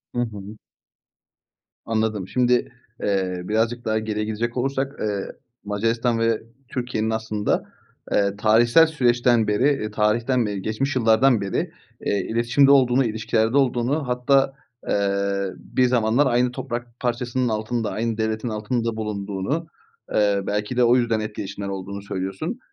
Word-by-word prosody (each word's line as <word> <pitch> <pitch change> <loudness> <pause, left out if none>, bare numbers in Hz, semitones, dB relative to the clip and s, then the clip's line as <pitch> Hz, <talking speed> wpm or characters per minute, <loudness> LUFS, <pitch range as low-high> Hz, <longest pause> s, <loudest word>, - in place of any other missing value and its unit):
Hı 120 - +1
hı. 105 -2 -6 1.3
Anladım. 110 -4 -1
Şimdi, 125 +1 +1 0.3
eee, 95 -3 -1
birazcık 115 +4 -1
daha 110 0 +1
geriye 110 -1 -2
gidecek 115 +3 -3
olursak, 135 +2 -1
eee, 100 -2 -2 0.4
Macaristan 115 +3 0
ve 115 -1 +1 0.3
Türkiye'nin 120 -4 -2
aslında, 110 -2 -1 0.5
eee, 100 -1 +2
tarihsel 115 +8 +5
süreçten 120 -6 +2
beri, 105 +3 +1
eee, 135 -7 +1
tarihten 115 +4 +1
beri 100 -2 -3
geçmiş 120 +7 -2
yıllardan 115 0 +4
beri, 100 -1 -2 0.3
eee, 100 - +1
iletişimde 120 +5 +4
olduğunu, 130 -1 +4
ilişkilerde 110 +2 0
olduğunu 135 +2 +1
hatta, 135 +2 +2 0.4
eee, 100 -1 0
bir 130 - 0
zamanlar 120 +2 +2
aynı 125 0 +2
toprak 120 -2 -6
parçasının 125 +1 -1
altında, 110 +1 -2
aynı 115 0 -2
devletin 110 +1 -1
altında 115 +2 -2
bulunduğunu, 105 - -3 0.5
eee, 100 -2 +3
belki 105 +4 -2
de 125 - +5
o 120 +1 +5
yüzden 115 -3 +1
etkileşimler 100 -2 -5
olduğunu 100 +1 -5
söylüyorsun. 100 - -4
115 Hz, 130 wpm, -23 LUFS, 105-125 Hz, 1.3 s, tarihsel